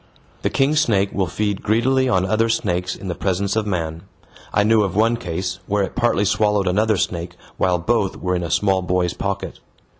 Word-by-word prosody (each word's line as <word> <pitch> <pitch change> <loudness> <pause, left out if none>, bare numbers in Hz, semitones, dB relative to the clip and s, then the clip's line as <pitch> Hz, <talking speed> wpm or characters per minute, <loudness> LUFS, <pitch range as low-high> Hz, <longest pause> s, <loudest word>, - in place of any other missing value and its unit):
The - - 0
king 140 +3 +2
snake 105 -10 +2
will 95 -2 0
feed 105 +2 -2
greedily 130 +4 +2
on 95 -5 +2
other 110 +3 +1
snakes 90 -4 -1
in 95 - -9
the 90 - -1
presence 100 +2 -1
of 110 -1 0
man 85 -4 -2 0.5
I 105 - +3
knew 110 +1 +4
of 95 -3 -1
one 115 +3 +3
case 90 -3 -4
where 105 0 +1
it - - -5
partly 115 -4 +2
swallowed 105 -1 +1
another 105 +3 +2
snake 85 -1 -3 0.2
while 90 -1 +2
both 100 +2 0
were 90 0 -1
in 90 - -1
a 85 - -4
small 95 +2 +2
boy's 90 -1 0
pocket. 100 0 -4
100 Hz, 200 wpm, -21 LUFS, 90-110 Hz, 0.5 s, knew